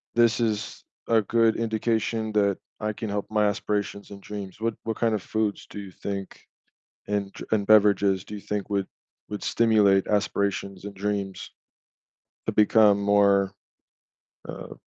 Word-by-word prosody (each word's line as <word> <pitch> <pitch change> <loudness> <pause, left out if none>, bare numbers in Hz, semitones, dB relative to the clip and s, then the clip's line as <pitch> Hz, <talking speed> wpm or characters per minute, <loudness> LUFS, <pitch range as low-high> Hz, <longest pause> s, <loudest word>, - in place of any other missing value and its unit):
this 120 0 +4
is 110 -1 -2 0.2
a 115 -1 +4
good 115 +2 +2
indication 110 -1 -1
that 100 -2 +2 0.2
I 105 0 0
can 110 +1 -5
help 105 +1 -3
my 105 -1 +3
aspirations 105 -1 -2
and 100 - -9
dreams. 100 0 -8
What 115 0 0
what 110 -1 -3
kind 115 -2 +1
of 100 - -3
foods 110 0 -2
do 105 - -7
you 95 -2 -8
think 100 +1 -6 0.7
and 100 -1 -1
dr - - -8
and 105 -2 +2
beverages 100 -3 +4
do 105 - -8
you 100 - -8
think 105 0 -4
would 100 -1 0 0.4
would 105 - -5
stimulate 105 -4 +3
aspirations 100 -1 -1
and 100 - -6
dreams 100 -1 -3 1.0
to - - +1
become 105 -1 +5
more 100 -1 +3 1.0
uh - - -7
105 Hz, 155 wpm, -26 LUFS, 100-110 Hz, 1.0 s, become